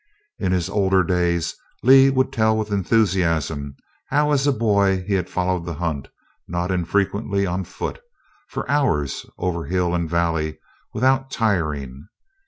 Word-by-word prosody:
In 95 - 0
his 90 -2 0
older 95 -2 +2
days 85 -1 0 0.3
Lee 135 +2 +7
would 130 -1 +1
tell 110 -1 +2
with 110 -1 -3
enthusiasm 85 -8 +1 0.3
how 150 +1 +2
as 140 -1 +2
a - - +5
boy 100 -6 +2
he 105 - 0
had 90 -3 0
followed 90 -1 -1
the 85 -1 -5
hunt, 75 -4 -3 0.4
not 85 +2 -2
infrequently 100 +3 0
on 90 +1 -2
foot, - - -5 0.5
for - - -5
hours 105 - 0
over 85 -2 -2
hill 90 -1 0
and 85 -2 -1
valley 80 -2 0 0.3
without 135 +3 +1
tiring. 75 - -1
95 Hz, 145 wpm, -22 LUFS, 85-110 Hz, 0.5 s, Lee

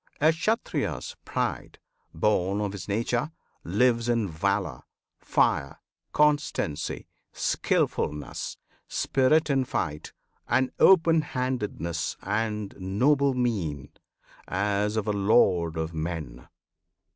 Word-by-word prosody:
A 155 +2 +5
Kshatriya's 220 - -2
pride, - - -3 0.3
Born 100 -2 +1
of 105 -1 -1
his 95 -3 -7
nature, 115 +6 0 0.3
lives 115 +5 +2
in 115 -3 +1
valour, 95 +4 -1 0.4
fire, 70 - +1 0.3
Constancy, 145 - 0 0.3
skilfulness, 75 -1 -1 0.3
spirit 150 +3 +2
in 135 -1 +2
fight, 75 - -3 0.4
And 130 +1 +2
open 165 -3 +6
handedness 105 - -3
and 105 0 -2
noble 130 +9 +2
mien, 85 - -1 0.6
As 105 +2 0
of 110 - 0
a 105 - 0
lord 90 -5 +3
of 80 +1 -3
men. 80 -6 -5
105 Hz, 100 wpm, -27 LUFS, 85-130 Hz, 0.6 s, open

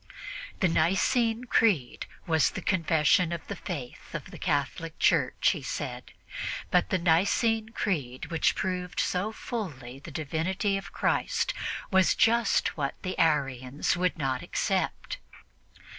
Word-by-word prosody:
The 190 - +5
Nicene 225 +8 +2
Creed 205 - +2 0.2
was 160 -2 +3
the - - -6
confession 165 -1 +3
of 170 -3 -4
Faith 165 -9 -7
of 150 - -6
the - - -10
Catholic 155 +1 -1
Church, - - +3
he - - -4
said. - - -5 0.6
But - - +3
the 190 - +2
Nicene 200 +6 +2
Creed, 150 - -3
which 165 -2 +2
proved 180 -1 -2
so 190 +4 0
fully 145 - -6
the 145 - -10
divinity 170 +6 -1
of 195 - -5
Christ, - - 0 0.4
was 190 -1 +4
just 230 -1 +3
what 140 -3 -2
the 185 -1 -3
Arians 135 -5 +1
would 180 0 0
not 135 -4 -1
accept. - - -1
170 Hz, 130 wpm, -28 LUFS, 150-195 Hz, 0.6 s, The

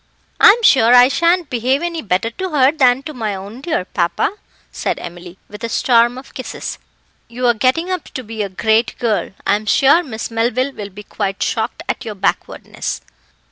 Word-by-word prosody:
"I'm 460 +4 +7
sure 245 - +6
I 245 +1 +7
shan't 340 +2 +1
behave 255 +5 0
any 335 -2 -3
better 200 +1 -1
to 375 +10 -5
her 275 -4 +4
than 265 -3 +2
to 305 +1 -7
my 220 -6 -3
own 200 +6 -9
dear 305 - -2
papa," 175 - -1 0.4
said - - -2
Emily, 175 +1 -9
with 210 +3 -11
a 230 - -2
storm 240 +1 +3
of 265 +1 -12
kisses. 255 - -6 0.5
"You're 240 +1 +1
getting 260 - 0
up 365 -3 -3
to 260 - -4
be 220 -1 -6
a 200 - -2
great 220 +4 +1
girl. 225 -4 -1 0.2
I'm 205 +2 0
sure 280 +9 +5
Miss 235 -8 -6
Melville 240 +4 0
will 205 -4 -7
be 205 +2 -11
quite 195 -1 -3
shocked - - -2
at - - -3
your 215 -2 -6
backwardness." 195 0 -3
240 Hz, 180 wpm, -18 LUFS, 210-275 Hz, 0.5 s, I'm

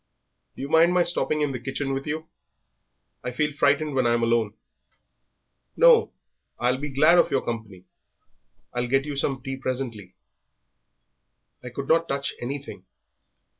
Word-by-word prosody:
"Do - - -7
you - - -3
mind 165 +3 +5
my 180 - +5
stopping 155 -3 0
in 145 -2 +1
the 130 - -4
kitchen 135 +2 -3
with 135 +2 -4
you? 155 +2 -4 1.0
I - - -2
feel 150 +4 -1
frightened 145 +1 +2
when 130 -2 +2
I'm 120 0 +2
alone." 115 -2 +1 1.2
"No, 485 -2 +6 0.5
I'll 125 +2 +1
be 145 +1 -4
glad 155 +6 +5
of - - +4
your - - 0
company. 110 -6 -6 0.9
I'll 120 0 -1
get 135 +2 +1
you 145 -1 -4
some 135 -2 -2
tea 135 -1 -4
presently." 125 -8 -5 1.5
"I 125 - -6
could 135 +3 -6
not 165 +1 +3
touch 140 0 -2
anything. 140 +3 -6
135 Hz, 150 wpm, -25 LUFS, 125-150 Hz, 1.5 s, No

